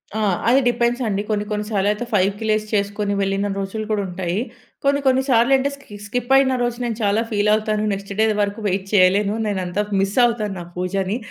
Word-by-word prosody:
ఆ! -, -, -1 dB, 0.3 s
అది 250 Hz, +3 st, +5 dB
డిపెండ్స్ 240 Hz, +1 st, 0 dB
అండి. 200 Hz, -1 st, -1 dB
కొన్ని, 210 Hz, -1 st, 0 dB
కొన్ని 210 Hz, 0 st, -2 dB
సార్లు 200 Hz, -2 st, 0 dB
అయితే 210 Hz, +3 st, -3 dB
ఫైవ్‌కి 200 Hz, +1 st, +1 dB
లేసి 215 Hz, 0 st, +1 dB
చేసుకొని 205 Hz, 0 st, 0 dB
వెళ్ళిన 195 Hz, +1 st, 0 dB
రోజులు 195 Hz, +3 st, -4 dB
కూడా 210 Hz, -1 st, +1 dB
ఉంటాయి. 180 Hz, 0 st, -3 dB, 0.5 s
కొన్ని, 280 Hz, 0 st, +2 dB
కొన్ని 260 Hz, 0 st, +4 dB
సార్లు 240 Hz, +1 st, +4 dB
అంటే 270 Hz, +2 st, 0 dB
స్కి 280 Hz, -7 st, -14 dB
స్కిప్ 245 Hz, +4 st, -3 dB
అయిన 265 Hz, -1 st, +4 dB
రోజు 240 Hz, -1 st, -1 dB
నేను 235 Hz, -3 st, -2 dB
చాలా 205 Hz, +2 st, +2 dB
ఫీల్ 210 Hz, 0 st, +1 dB
అవుతాను. 215 Hz, 0 st, 0 dB
నెక్స్ట్ 195 Hz, 0 st, -7 dB
డే 220 Hz, -, +5 dB, 0.2 s
వరకు 205 Hz, +2 st, -2 dB
వెయిట్ 190 Hz, 0 st, -1 dB
చేయలేను. 200 Hz, +1 st, +4 dB
నేనంత 190 Hz, -2 st, -2 dB, 0.2 s
మిస్ 195 Hz, +3 st, -2 dB
అవుతాను 215 Hz, -4 st, -1 dB
నా -, -, -6 dB
పూజని. 190 Hz, +3 st, -1 dB
210 Hz, 195 wpm, -21 LUFS, 195-230 Hz, 0.5 s, అది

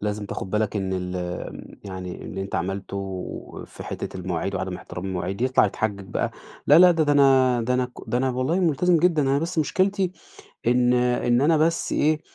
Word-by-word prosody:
لازم 105 Hz, 0 st, -3 dB
تاخد 95 Hz, -, -5 dB
بالك 105 Hz, +1 st, 0 dB
إن 95 Hz, -2 st, -2 dB
ال 90 Hz, 0 st, -3 dB
آمم، 90 Hz, 0 st, -6 dB
يعني 95 Hz, -2 st, -7 dB
اللي 95 Hz, -, -5 dB
أنت 95 Hz, -, -7 dB
عملته 95 Hz, 0 st, -5 dB
في -, -, -11 dB
حتّة -, -, -5 dB
المواعيد 90 Hz, +1 st, -3 dB
وعدم 95 Hz, -1 st, -3 dB
إحترام 90 Hz, +1 st, -8 dB
المواعيد، 95 Hz, +2 st, -3 dB
يطلع 130 Hz, -3 st, +4 dB
يتحجج 100 Hz, -1 st, -3 dB
بقى، -, -, -1 dB, 0.4 s
لا 150 Hz, -, +7 dB
لا 180 Hz, 0 st, +8 dB
ده 165 Hz, -2 st, +2 dB
ده 145 Hz, -, +2 dB
أنا 130 Hz, -3 st, +4 dB
ده 125 Hz, +2 st, 0 dB
أنا 125 Hz, -, +2 dB
ك -, -, -21 dB, 0.2 s
ده 120 Hz, +3 st, 0 dB
أنا 130 Hz, 0 st, +1 dB
والله 130 Hz, +9 st, 0 dB
ملتزم 175 Hz, +1 st, +3 dB
جدًا، 165 Hz, -2 st, +3 dB
أنا 135 Hz, 0 st, +2 dB
بس 165 Hz, +2 st, -3 dB
مشكلتي 190 Hz, +4 st, +1 dB, 0.5 s
إن 125 Hz, +1 st, +3 dB
إن 125 Hz, 0 st, +2 dB
أنا 155 Hz, +3 st, +4 dB
بس 165 Hz, +2 st, +1 dB
إيه، 155 Hz, +1 st, +2 dB
125 Hz, 195 wpm, -24 LUFS, 95-150 Hz, 0.5 s, لا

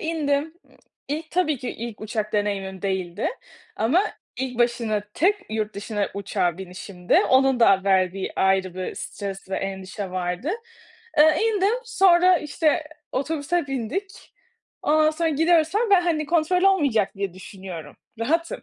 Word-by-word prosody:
indim. 315 Hz, -1 st, -1 dB
Imm, -, -, -24 dB, 0.3 s
ilk, 310 Hz, +3 st, -4 dB
tabii 325 Hz, -5 st, +1 dB
ki, 250 Hz, -, -4 dB
ilk 230 Hz, -2 st, -7 dB
uçak 215 Hz, 0 st, -3 dB
deneyimim 195 Hz, -2 st, -2 dB
değildi 185 Hz, -3 st, -1 dB, 0.5 s
ama 345 Hz, -, +2 dB, 0.2 s
ilk 255 Hz, -2 st, -4 dB
başına 235 Hz, -3 st, +1 dB
tek 385 Hz, +6 st, +3 dB, 0.2 s
yurt 215 Hz, -1 st, -2 dB
dışına 205 Hz, 0 st, -2 dB
uçağa 190 Hz, -3 st, -1 dB
binişimdi. 180 Hz, +1 st, -4 dB
Onun 265 Hz, -1 st, +4 dB
da 195 Hz, -4 st, +5 dB
verdiği 190 Hz, -1 st, +1 dB
ayrı 190 Hz, -1 st, +2 dB
bir 185 Hz, 0 st, -4 dB
stres 195 Hz, -2 st, -6 dB
ve -, -, -1 dB
endişe 195 Hz, 0 st, -5 dB
vardı. 180 Hz, -, -2 dB, 0.7 s
Iıı, 310 Hz, +1 st, +6 dB
indim, 430 Hz, -1 st, +2 dB
sonra, 370 Hz, -5 st, +5 dB
işte, 305 Hz, +1 st, 0 dB, 0.3 s
otobüse 300 Hz, +3 st, -1 dB
bindik. 275 Hz, -, -5 dB, 0.5 s
Ondan 310 Hz, +1 st, +4 dB
sonra 325 Hz, +1 st, -1 dB
gidiyoruz 320 Hz, +1 st, +3 dB
falan 420 Hz, +5 st, +1 dB
ama 440 Hz, -, -3 dB
ben, 360 Hz, -, +4 dB
hani, 315 Hz, -3 st, 0 dB
kontrol 340 Hz, +3 st, +2 dB
olmayacak 285 Hz, -, +3 dB
diye 195 Hz, -2 st, -4 dB
düşünüyorum, 185 Hz, -5 st, -9 dB, 0.2 s
rahatım 330 Hz, +8 st, -1 dB
245 Hz, 140 wpm, -24 LUFS, 195-325 Hz, 0.7 s, Iıı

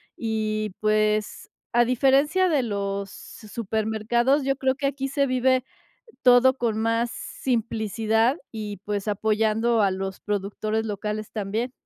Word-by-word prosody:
y, 215 Hz, -2 st, -2 dB
pues, 215 Hz, 0 st, 0 dB, 0.2 s
a 240 Hz, +1 st, +5 dB
diferencia 275 Hz, +9 st, +3 dB
de 300 Hz, -7 st, +2 dB
los 200 Hz, -2 st, -3 dB
su 215 Hz, -, -12 dB
supermercados, 225 Hz, +5 st, 0 dB
yo 275 Hz, 0 st, +1 dB
creo 265 Hz, -1 st, 0 dB
que 280 Hz, +1 st, -4 dB
aquí 275 Hz, 0 st, -1 dB
se 280 Hz, 0 st, +1 dB
vive 255 Hz, 0 st, +2 dB, 0.6 s
todo 255 Hz, +1 st, +6 dB
con 230 Hz, -4 st, -1 dB
más 230 Hz, +1 st, +1 dB
simplicidad 225 Hz, -, -1 dB
y, 210 Hz, -3 st, -6 dB
pues, 205 Hz, 0 st, -2 dB
apoyando 220 Hz, +2 st, +1 dB
a 200 Hz, -, +3 dB
los 190 Hz, 0 st, -4 dB
productores 210 Hz, +2 st, -2 dB
locales 210 Hz, 0 st, -4 dB
también. 220 Hz, +4 st, -2 dB
220 Hz, 130 wpm, -25 LUFS, 210-255 Hz, 0.6 s, todo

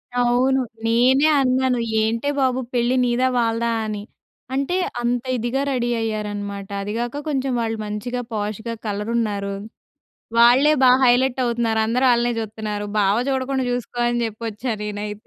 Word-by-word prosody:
అవును. 245 Hz, +2 st, +2 dB, 0.3 s
నేనే 255 Hz, +5 st, +4 dB
అన్నాను. 255 Hz, -1 st, +1 dB, 0.2 s
ఏంటే 225 Hz, +5 st, -1 dB
బాబు 260 Hz, -1 st, +1 dB
పెళ్ళి 245 Hz, +1 st, +1 dB
నీదా 245 Hz, +1 st, +2 dB
వాళ్ళదా 230 Hz, 0 st, 0 dB
అని. 210 Hz, -1 st, -4 dB, 0.5 s
అంటే 275 Hz, +6 st, 0 dB, 0.3 s
అంత 240 Hz, 0 st, 0 dB
ఇదిగా 240 Hz, +4 st, -1 dB
రెడీ 240 Hz, -2 st, 0 dB
అయ్యారనమాట. 205 Hz, -2 st, -4 dB
అది 200 Hz, +1 st, -4 dB
గాక 240 Hz, +5 st, -3 dB
కొంచెం 270 Hz, -2 st, -1 dB
వాళ్ళు 225 Hz, -1 st, -2 dB
మంచిగా, 235 Hz, +4 st, -4 dB
పోష్‌గా 215 Hz, +2 st, -3 dB
కలరున్నారు. 210 Hz, -1 st, -2 dB, 0.9 s
వాళ్ళే 250 Hz, +6 st, +6 dB
బాగా 255 Hz, 0 st, +6 dB
హైలైట్ 250 Hz, +1 st, +3 dB
అవుతున్నారు. 235 Hz, -2 st, 0 dB
అందరూ 245 Hz, +4 st, +1 dB
ఆళ్ళనే 240 Hz, 0 st, +1 dB
చూత్తన్నారు. 215 Hz, -1 st, -4 dB
బావ 200 Hz, -1 st, +3 dB
జూడకుండా 265 Hz, 0 st, -1 dB
జూసుకో 245 Hz, 0 st, -4 dB
అని 240 Hz, 0 st, 0 dB
జెప్పొచ్చా 225 Hz, +2 st, -4 dB
నేనైతే. 210 Hz, 0 st, -5 dB
235 Hz, 135 wpm, -22 LUFS, 215-255 Hz, 0.9 s, వాళ్ళే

